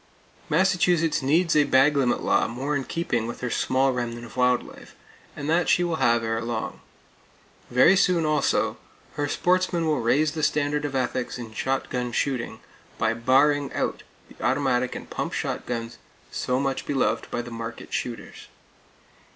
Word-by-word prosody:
Massachusetts 175 -2 +2
needs 160 +6 +2
a 150 - +6
bag 140 +1 +4
limit 125 -4 +1
law - - +2
more 135 +6 -3
in 135 - -1
keeping 120 -9 -2
with 120 - -7
her 125 -1 -2
small 130 +1 +1
remnant 120 -1 -4
of 120 - -13
wild 125 -1 +3
life; - - -14 0.4
and 145 - -5
that 170 +2 +2
she 175 - +4
will 170 -2 -1
have 115 -3 +2
ere 115 0 -1
long. 115 -1 -4 0.9
Very 130 +10 +5
soon, 180 -3 +3
also, 155 0 +1 0.4
her 145 0 -2
sportsmen 180 +1 +1
will 155 -2 +1
raise 145 +6 +2
the 155 -1 -4
standard 150 0 0
of 140 -2 -4
ethics 130 -1 -2
in 115 -3 -8
shotgun 125 0 -2
shooting, 120 -3 -2 0.4
by 110 0 +1
barring 135 +5 +3
out - - -2 0.3
the - - -13
automatic 125 -3 +1
and - - -9
pump - - -3
shotguns 115 -1 -4 0.3
so 125 +1 -1
much 135 -1 -2
beloved 140 -2 0
by 120 - -3
the 120 - -9
market 115 0 -7
shooters. 120 -3 -5
135 Hz, 160 wpm, -25 LUFS, 120-150 Hz, 0.9 s, a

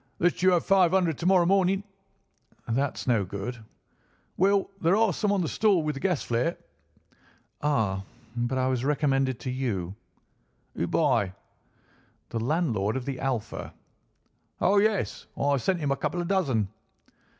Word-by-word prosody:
"Let 175 0 +1
you 185 - +5
have 175 - +1
five 190 -3 +5
hundred 175 -5 +2
to 175 - -1
morrow 185 -2 +5
morning." 195 +1 +2 0.8
"That's 135 +4 -1
no 115 -5 +2
good." 100 +6 -5 0.8
"Well, 195 +2 +2
there 170 +3 +4
are 220 -3 +3
some 205 +5 0
on 200 -2 +1
the 165 - -1
stall 200 -4 +2
with 150 0 -1
the 135 - -6
gas 180 -4 0
flare." 120 +8 -1 1.0
"Ah, 110 -10 +1 0.3
but 120 +2 -1
I 130 - +1
was 130 -2 0
recommended 135 -3 +1
to 130 - -3
you." 105 -9 -2 0.8
"Who - - -2
by?" 95 -2 +1 1.0
"The 115 - -3
landlord 120 - 0
of 130 - -5
the 135 -2 -4
Alpha." 125 -5 -3 0.8
"Oh, 205 - +3
yes; 215 0 0
I 140 0 +2
sent 175 +8 0
him 145 -3 -1
a - - +2
couple 175 - -2
of 175 - -2
dozen." 135 - +1
145 Hz, 155 wpm, -27 LUFS, 120-185 Hz, 1.0 s, you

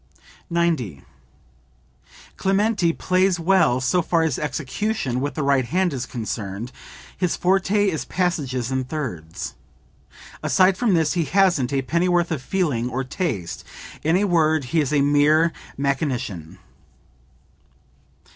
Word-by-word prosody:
90. 160 - 0 1.3
"Clementi 195 -2 +2
plays 185 +1 +1
well 170 -7 +3
so 155 +8 +2
far 165 0 +1
as 160 -5 0
execution 150 - -2
with 145 +1 -3
the 155 - -1
right 140 -2 +2
hand 180 +4 0
is 125 -3 -4
concerned; 110 -1 -5 0.4
his 180 -2 0
forte 195 +3 +2
is 160 -5 -1
passages 135 -9 -1
in 130 0 0
thirds. 120 - -5 0.9
Aside 185 0 +4
from 215 -2 +2
this 160 -2 +2
he 170 -3 0
hasn't 175 -8 +2
a 135 -1 0
pennyworth 175 +3 +1
of 155 -5 -2
feeling 130 -7 -1
or 130 +2 -2
taste; 130 - -3 0.4
in 160 +4 +2
a 200 - +1
word 160 -5 +2
he 165 - +4
is 145 - -2
a 145 -2 +3
mere 150 +3 +4 0.2
mechanician." 125 - -2
155 Hz, 130 wpm, -22 LUFS, 130-180 Hz, 1.3 s, Aside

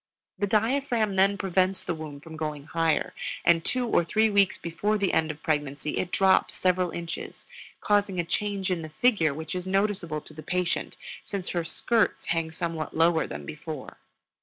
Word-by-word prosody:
The 205 - +1
diaphragm 225 0 +1
then 195 +1 +4
prevents 190 0 +1
the - - -2
womb 155 -3 -7
from 160 +1 -10
going 150 -2 -4
higher; 165 +1 0 0.3
and 170 -1 +5
two 250 +5 0
or 195 - +3
three 215 +6 +2
weeks 200 -2 +3
before 205 +6 -1
the 200 -2 0
end 160 0 +2
of 150 0 -7
pregnancy 145 -1 -1
it 180 - -1
drops 190 -1 +3
several 185 -1 +2
inches, 170 0 -6 0.4
causing 205 -3 +2
a - - +2
change 195 +2 -1
in 175 -2 0
the 155 - -7
figure 170 - +3
which 160 +2 -5
is 180 0 -4
noticeable 190 -5 0
to 155 - -14
the 155 - -9
patient, 180 +3 -1 0.3
since 195 -3 -4
her 175 -2 -1
skirts 225 +6 +1
hang 165 -1 -1
somewhat 160 -2 -4
lower 165 0 +3
than - - -7
before. 155 -2 -7
175 Hz, 180 wpm, -27 LUFS, 160-200 Hz, 0.4 s, and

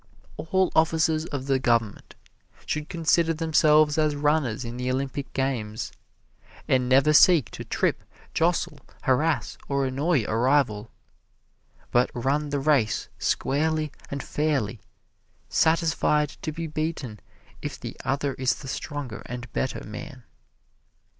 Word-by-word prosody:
All 190 +3 0
officers 160 0 +2
of 135 -3 -4
the 135 -1 +2
government 115 -5 0 0.5
should 155 0 -3
consider 165 -1 +2
themselves 155 -1 +4
as 155 -1 +2
runners 145 -5 0
in 120 +1 -6
the 125 0 -2
Olympian 135 +1 -2
games, 115 -5 -2 0.8
and 125 -1 +2
never 135 +4 +5
seek 150 - +6
to - - -7
trip, - - -1 0.3
jostle, 165 -3 0 0.2
harass 150 +5 +1
or 140 -1 +1
annoy 135 +1 +1
a 110 - -2
rival, 120 -4 +2 1.0
but 120 +1 +3
run 140 +5 0
the 145 0 -1
race 135 -6 +1
squarely 155 +1 0 0.2
and 140 0 -4
fairly, 135 -8 -1 0.7
satisfied 160 -2 +2
to 155 - -3
be 165 +2 -5
beaten 155 -8 -4 0.4
if - - -5
the - - -7
other 135 +1 -1
is 130 -1 0
the 135 - -10
stronger 135 -3 -5
and 125 0 -7
better 130 - -2
man. 125 +5 -9
145 Hz, 125 wpm, -26 LUFS, 125-155 Hz, 1.0 s, seek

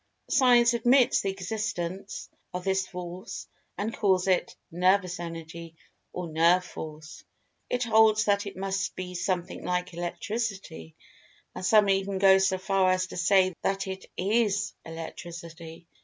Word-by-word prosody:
Science 240 -3 +5
admits 240 +2 +4
the 195 - -1
existence 195 -1 -4 0.3
of 180 - -3
this 190 0 0
Force, 180 0 -7 0.3
and 215 +3 -3
calls 190 -3 +2
it 185 -1 +1 0.2
"Nervous 180 +1 +2
Energy," 165 -1 -8 0.4
or 180 -1 -5
"Nerve 170 +3 +3
Force." 155 -2 -9 0.5
It 250 0 0
holds 220 -2 +4
that 200 0 +1
it 200 - -8
must 195 0 -2
be 180 0 -6
something 180 0 -3
like 180 0 -2
Electricity, 175 - -4 0.6
and - - -7
some 210 +2 +5
even 195 0 +1
go 190 0 +6
so 190 0 +2
far 190 0 +2
as 185 0 +2
to - - -10
say 185 +1 +3
that 195 +1 -1
it 190 0 -7
is 205 +1 +1
Electricity. 165 0 -9
190 Hz, 140 wpm, -27 LUFS, 175-200 Hz, 0.6 s, go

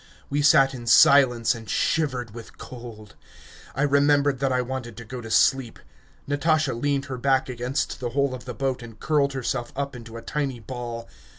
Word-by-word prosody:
We 145 +1 +1
sat 135 -2 +5
in 120 -2 -8
silence 125 -1 +5
and 115 -4 -10
shivered 130 - -1
with 115 -1 -11
cold. 115 -4 -10 0.6
I 135 - 0
remembered 145 -1 +3
that 135 0 0
I 125 0 +1
wanted 125 -3 -6
to 120 - -9
go 125 +3 -7
to 115 - -9
sleep. 125 0 +2 0.5
Natasha 155 0 +1
leaned 140 +3 -1
her 130 -2 -6
back 135 0 +1
against 125 +2 -3
the 125 - -3
hull 140 +1 0
of 125 - -8
the 125 -2 -6
boat 135 -1 -2
and 115 -2 -11
curled 145 -3 +1
herself 120 -2 -3
up 140 0 -3
into 115 -1 -9
a 115 - -9
tiny 140 -3 -3
ball. 115 0 -6
130 Hz, 185 wpm, -24 LUFS, 120-140 Hz, 0.6 s, sat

